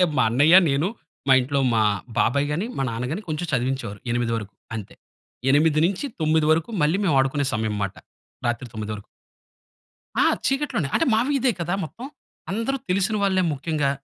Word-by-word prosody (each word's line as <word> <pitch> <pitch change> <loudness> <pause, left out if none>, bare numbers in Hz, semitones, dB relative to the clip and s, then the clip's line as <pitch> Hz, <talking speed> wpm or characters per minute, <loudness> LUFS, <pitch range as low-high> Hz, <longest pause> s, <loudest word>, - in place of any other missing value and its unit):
అంటే - - +6
మా - - +5
అన్నయ్య, 145 +8 +5 0.2
నేను 140 +6 +1 0.4
మా - - +7
ఇంట్లో 140 +2 0
మా 110 - +3 0.4
బాబాయ్ 140 +7 +2
గాని, 175 +8 -1
మా - - +1
నాన్న 115 +2 -3
గాని 200 - -4
కొంచెం 155 +3 -2
చదివించేవారు, 125 -5 -2
8 120 -1 0
వరకు 105 -2 -7 0.2
అంతే. 105 -3 -8 0.6
8 155 +2 +4
నుంచి 200 +9 -2
9 155 0 +2
వరకు 160 +5 0
మళ్ళీ 155 +4 +3
మేము 165 -7 +2
ఆడుకునే 135 +1 0
సమయం 110 -1 -1
మాట. 100 -1 -2 0.5
రాత్రి 120 +2 -1
9 110 -2 -5
వరకు. 100 -1 -10 1.1
ఆ! - - +5 0.2
చీకట్లోనే. 270 - 0
అంటే - - +3
మా 220 - +4
వీధే 270 -3 +2
కదా 175 +2 -1
మొత్తం. 235 - -8 0.4
అందరు 230 +7 -1
తెలిసిన 195 +3 +1
వాళ్ళే 190 -2 +2
ముఖ్యంగా. 145 0 -1
150 Hz, 170 wpm, -23 LUFS, 125-185 Hz, 1.1 s, మా